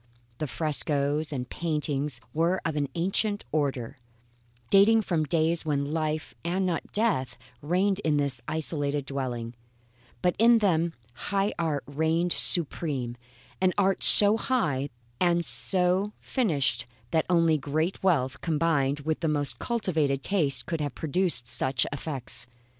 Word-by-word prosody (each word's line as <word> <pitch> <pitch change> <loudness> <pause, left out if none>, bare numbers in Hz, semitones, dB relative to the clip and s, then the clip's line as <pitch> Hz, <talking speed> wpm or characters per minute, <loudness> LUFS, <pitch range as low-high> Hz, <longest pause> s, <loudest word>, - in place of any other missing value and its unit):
The 155 - -2
frescoes 150 0 0
and 125 -4 -4
paintings 150 -5 -2
were 170 +4 +1
of 160 -2 -1
an 145 -2 -1
ancient 200 +4 -1
order, 135 -7 -2 0.7
dating 215 +3 +5
from 165 -5 0
days 165 +2 0
when 145 -1 -2
life 155 -1 -2
and 180 +3 -1
not 175 -3 -3
death 195 - 0 0.2
reigned 185 +6 0
in 155 -6 0
this 140 -4 0
isolated 145 -3 -2
dwelling; 125 -4 -4 0.7
but 180 -1 +2
in 235 +1 +6
them 170 -6 +1 0.2
high 200 +8 -1
art 155 -4 -1
reigned 160 +4 0
supreme, 140 -7 0 0.5
an 185 -1 +2
art 195 -1 +1
so 205 +1 +9
high 150 - -1 0.3
and 175 -1 +2
so 185 +2 +2
finished 140 - 0 0.2
that 160 -2 +1
only 165 -3 +3
great 155 +6 -2
wealth, 145 -9 0
combined 150 -4 0
with 155 +2 -2
the 165 - -1
most 145 -5 -1
cultivated 160 - -1
taste, 145 -10 0
could 165 -3 -3
have 145 -3 -4
produced 160 -6 0
such 125 +1 0
effects. 140 -4 -1
155 Hz, 135 wpm, -27 LUFS, 140-180 Hz, 0.7 s, so